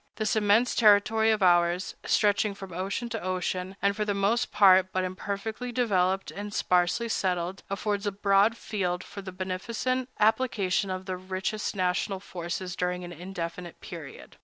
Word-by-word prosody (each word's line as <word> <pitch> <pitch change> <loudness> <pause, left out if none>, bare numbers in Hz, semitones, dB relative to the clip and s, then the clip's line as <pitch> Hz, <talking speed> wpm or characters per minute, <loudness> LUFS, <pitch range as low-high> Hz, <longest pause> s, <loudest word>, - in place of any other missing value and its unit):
This 215 -1 0
immense 215 +3 +3
territory 220 0 +4
of 215 -2 +2
ours, 175 +1 +3
stretching 205 -1 +2
from 195 -2 -9
ocean 195 +7 -3
to 225 -1 -4
ocean, 185 +1 -2
and 200 0 +3
for 215 - -1
the 205 -1 -1
most 205 +5 +1
part 190 -2 +6
but 185 - 0
imperfectly 200 +6 -4
developed 195 -6 +1
and 205 +1 -6
sparsely 180 +4 +1
settled, 185 -3 -1
affords 205 +1 -2
a - - +1
broad 200 +3 +3
field 185 -6 -2
for 200 - -9
the 190 -1 -7
beneficent 225 +8 -2
application 210 -4 +2
of 185 0 -4
the 185 -1 -3
richest 190 +4 -3
national 185 +1 0
forces 180 -1 -5
during 180 0 -2
an 175 - -7
indefinite 175 0 -6
period. - - -10
195 Hz, 160 wpm, -27 LUFS, 185-210 Hz, -, part